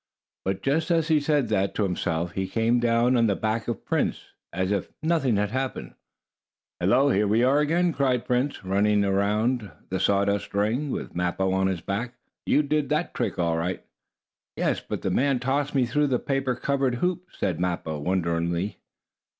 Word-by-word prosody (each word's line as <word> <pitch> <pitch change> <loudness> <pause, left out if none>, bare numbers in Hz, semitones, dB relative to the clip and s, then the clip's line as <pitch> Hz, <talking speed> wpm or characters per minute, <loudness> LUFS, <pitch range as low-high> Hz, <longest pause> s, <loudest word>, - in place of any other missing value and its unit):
But, 95 0 -2
just 155 +5 +1
as 165 -2 +2
he 155 -1 +4
said 145 -5 +1
that 100 -2 0
to 105 - +1
himself, 85 -2 -1
he 95 +1 -2
came 115 +3 +1
down 120 +1 +3
on 115 -2 +4
the 100 - +1
back 110 +2 -2
of 120 -4 -4
Prince, - - -1 0.2
as 95 +2 -1
if 100 -3 -1
nothing 155 -8 +2
had 105 0 0
happened. 130 +1 -3 0.9
"Hello, 140 +2 +3
here 105 0 +2
we 110 +4 +3
are 135 +3 +4
again!" 170 +3 +2
cried 130 -4 +1
Prince, 125 -3 -1
running 100 +2 +2
on 100 - +1
around 105 +3 0 0.2
the 95 - -2
sawdust 100 +1 +1
ring, 115 +9 0
with - - -4
Mappo 90 +2 0
on 95 0 +2
his 95 -3 -2
back. 115 +6 -3 0.3
"You 150 - +4
did 150 -1 0
that 155 +3 0
trick - - -2
all 85 -2 +1
right." 90 +3 -3 0.7
"Yes, - - 0
but - - -6
the 95 - 0
man 135 +6 +2
tossed 140 +3 -1
me 130 -2 +3
through 145 +5 +1
the 130 -2 +1
paper 135 -1 -1
covered 135 -1 0
hoop," 180 +6 -1
spoke 85 -3 -2
Mappo, 85 -4 -2
wonderingly. 85 +2 -1
115 Hz, 185 wpm, -25 LUFS, 95-135 Hz, 0.9 s, he